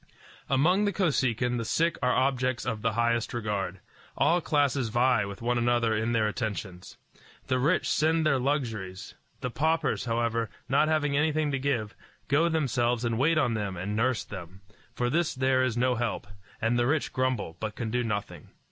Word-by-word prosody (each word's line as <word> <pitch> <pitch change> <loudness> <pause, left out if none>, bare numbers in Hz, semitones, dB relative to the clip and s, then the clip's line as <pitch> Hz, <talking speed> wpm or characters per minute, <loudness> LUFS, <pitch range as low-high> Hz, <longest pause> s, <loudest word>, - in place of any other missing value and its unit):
Among 175 +10 +3
the 205 - +1
Kosekin 130 - +1
the - - -2
sick 165 +9 +1
are 125 - +2
objects 130 -2 0
of 110 -2 -2
the 115 0 0
highest 120 +1 0
regard. 100 -5 -3 0.4
All 175 +1 +3
classes 140 -6 +1
vie 120 -2 +2
with 100 +3 -8
one 120 0 +1
another 120 -2 +2
in 110 +2 0
their 110 -2 +2
attentions. 100 -4 -5 0.5
The 130 -1 0
rich 155 +8 +2
send 160 +1 +2
their 140 -4 +3
luxuries; 115 -9 -3 0.3
the 125 - -3
paupers, 160 +1 0
however, 115 -1 0 0.2
not 140 +4 +3
having 150 -2 +1
anything 150 0 +1
to 135 - -1
give, 120 -6 -1 0.4
go 155 +5 +3
themselves 125 -6 0
and 115 -1 -1
wait 155 +4 +3
on 125 -6 +2
them 100 -4 -3
and 100 +4 -3
nurse 120 +1 +1
them. 95 -1 -9 0.3
For 120 - 0
this 155 +5 0
there 130 0 +2
is 130 -2 0
no 125 +1 +2
help, 120 -1 -2 0.3
and 115 +2 +1
the 120 - +2
rich 150 +2 0
grumble, 130 -10 -1
but 110 -1 -4
can 115 -2 -4
do 125 +1 0
nothing. 105 -3 -4
125 Hz, 180 wpm, -28 LUFS, 110-140 Hz, 0.5 s, Among